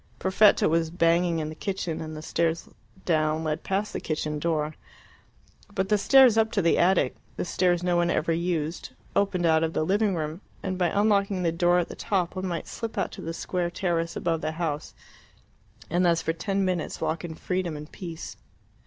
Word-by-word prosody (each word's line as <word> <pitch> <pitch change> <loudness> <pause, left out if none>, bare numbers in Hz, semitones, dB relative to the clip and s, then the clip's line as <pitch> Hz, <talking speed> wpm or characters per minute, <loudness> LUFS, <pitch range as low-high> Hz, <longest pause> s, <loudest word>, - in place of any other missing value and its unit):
Perfetta 200 +3 +4
was 165 0 +1
banging 170 0 +2
in 155 -1 -2
the - - -6
kitchen, 180 -1 -3
and 155 -1 -6
the 155 - -8
stairs 165 0 -1 0.4
down 155 -1 +1
led 155 -1 -2
past 200 +2 -1
the - - -2
kitchen 150 -1 -3
door. 155 -1 -1 1.0
But 190 0 0
the 210 - +4
stairs 255 -1 +6
up 220 0 +2
to 200 - +2
the 170 - +3
attic 175 -7 +3 0.2
the - - -3
stairs 175 0 +1
no 175 -1 +2
one 175 0 +2
ever 170 - +1
used 165 -1 -2 0.2
opened 195 -3 +1
out 160 -1 +4
of 165 0 -1
the 155 - 0
living 200 +2 +2
room, 155 +2 -4 0.2
and 190 -1 -2
by 180 -1 +1
unlocking 200 -1 +2
the 165 - +2
door 175 +1 +3
at 175 - +1
the - - -8
top 185 -4 -1
one 185 0 -3
might 170 -3 -3
slip 230 -1 -6
out 195 - 0
to - - -9
the 165 - -4
square 175 +1 -2
terrace 170 -2 -1
above 165 -2 -1
the 155 0 -2
house, 155 -3 -3 0.9
and 175 +3 +1
thus 170 -2 +3
for 165 - 0
ten 195 +4 -1
minutes 180 -3 -2
walk 160 +1 -2
in 165 -2 -6
freedom 180 -2 -2
and 150 +1 -10
peace. 170 -3 -7
170 Hz, 200 wpm, -26 LUFS, 160-190 Hz, 1.0 s, stairs